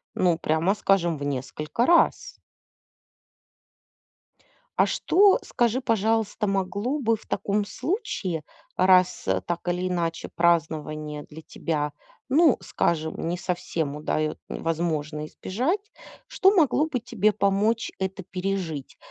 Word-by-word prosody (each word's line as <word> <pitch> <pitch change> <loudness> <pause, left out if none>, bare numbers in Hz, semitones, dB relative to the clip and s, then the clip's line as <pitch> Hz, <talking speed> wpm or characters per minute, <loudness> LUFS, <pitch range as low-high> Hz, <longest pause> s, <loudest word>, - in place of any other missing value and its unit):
Ну, 175 -3 +2
прямо 165 +4 +1
скажем, 175 -6 +2
в 140 - -6
несколько 145 - -2
раз. 345 - +3 2.5
А - - +5
что, 400 +5 +4
скажи 240 +2 0
пожалуйста, 225 -2 0
могло 200 +8 -1
бы 230 -4 +2
в - - -19
таком 205 +1 -1
случае, 200 - -3 0.3
раз, 185 -1 +4
а, 95 -1 +1
так 170 - -4
или 180 +1 0
иначе 170 -2 -2
празднование 155 -3 0
для 155 +2 -12
тебя, 150 -2 -3 0.4
ну 300 -1 +5
скажем, 160 -1 -1
не 175 +1 -1
совсем 175 -5 -2
удаёт 155 0 -1
возможно 155 -2 -2
избежать, 325 - -2 0.4
что 385 - +4
могло 305 -3 +4
бы 280 -6 -2
тебе 215 -3 +1
помочь 210 +3 +1
это 190 0 -3
пережить? 180 -6 -4
185 Hz, 115 wpm, -25 LUFS, 160-225 Hz, 2.5 s, А